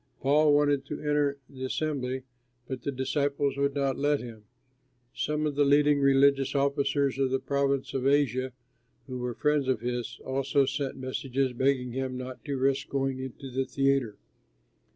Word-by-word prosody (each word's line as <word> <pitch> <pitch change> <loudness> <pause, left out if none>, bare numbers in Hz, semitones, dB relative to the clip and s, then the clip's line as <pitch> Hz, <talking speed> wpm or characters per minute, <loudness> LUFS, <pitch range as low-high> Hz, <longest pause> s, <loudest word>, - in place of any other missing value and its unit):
Paul 145 +2 +4
wanted 145 -1 +3
to 150 - -5
enter 145 -1 +1
the 130 -1 -9
assembly, 130 -2 -2 0.4
but 130 -2 -5
the 140 - -2
disciples 140 +1 0
would 140 0 0
not 135 -2 0
let 145 0 +2
him. 115 -3 -10 0.7
Some 150 0 -1
of 150 - 0
the 145 +1 +3
leading 145 +1 +4
religious 140 0 +4
officers 140 0 +1
of 135 -1 +2
the 130 - +1
province 140 0 0
of 135 0 0
Asia, 130 -2 +2 0.5
who 130 -2 -6
were 125 -1 -3
friends 150 0 +1
of 130 -4 +1
his, 120 0 -3
also 135 +1 +1
sent 140 0 -3
messages 130 0 -2
begging 130 0 +1
him 130 0 -3
not 130 0 -7
to 140 -2 -2
risk 135 +1 0
going 135 -1 -1
into 130 +1 -7
the 130 +1 -1
theatre. 135 -5 +1
135 Hz, 165 wpm, -28 LUFS, 130-140 Hz, 0.7 s, Paul